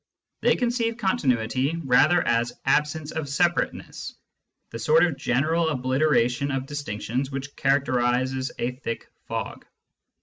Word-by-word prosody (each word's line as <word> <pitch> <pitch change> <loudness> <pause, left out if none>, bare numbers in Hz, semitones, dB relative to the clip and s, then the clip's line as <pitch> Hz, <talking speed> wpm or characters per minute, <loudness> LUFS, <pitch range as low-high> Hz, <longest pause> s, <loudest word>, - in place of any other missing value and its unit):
They - - +4
conceive 235 -2 0
continuity 135 - 0
rather 135 +7 +4
as 120 0 0
absence 150 +2 +1
of 160 -3 -4
separateness, 175 +4 -1 0.6
the 115 - -6
sort 155 +8 +4
of 165 -5 -1
general 155 +5 +1
obliteration 130 -1 +1
of 135 -1 -2
distinctions 135 -2 -3
which 140 +1 -6
characterises 130 -1 +1
a 120 - -1
thick 125 -2 -6 0.2
fog. - - -4
135 Hz, 115 wpm, -25 LUFS, 125-155 Hz, 0.6 s, They